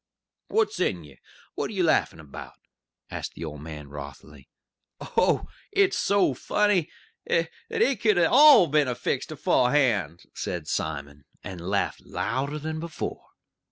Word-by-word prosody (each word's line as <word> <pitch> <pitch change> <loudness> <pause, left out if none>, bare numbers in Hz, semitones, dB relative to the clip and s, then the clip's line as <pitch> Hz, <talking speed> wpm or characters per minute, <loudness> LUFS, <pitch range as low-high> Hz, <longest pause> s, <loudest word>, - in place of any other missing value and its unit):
"What's 435 - 0
in 90 - 0
ye? 70 -4 -16 0.3
What - - -3
are - - -7
ye - - 0
laughin' - - +2
about?" 75 -3 -11 0.5
asked - - -5
the 85 - -6
old 75 -2 -7
man 75 -2 -8
wrothily. 70 0 -11 0.5
"Oh, - - +1 0.3
it's 400 -1 +3
so 200 -8 +2
funny 195 +5 +1 0.4
that 165 -1 +1 0.2
it 260 -5 +1
could 215 -4 +3
all 255 - +7
'a' - - -8
been 140 -4 +2
fixed - - -2
aforehand!" 115 - +1
said 85 -3 -5
Simon, 70 -2 -4 0.2
and 90 -3 -7
laughed 100 0 -1
louder 135 +7 -3
than 155 +1 -4
before. 165 -1 -6
125 Hz, 140 wpm, -26 LUFS, -, 0.5 s, all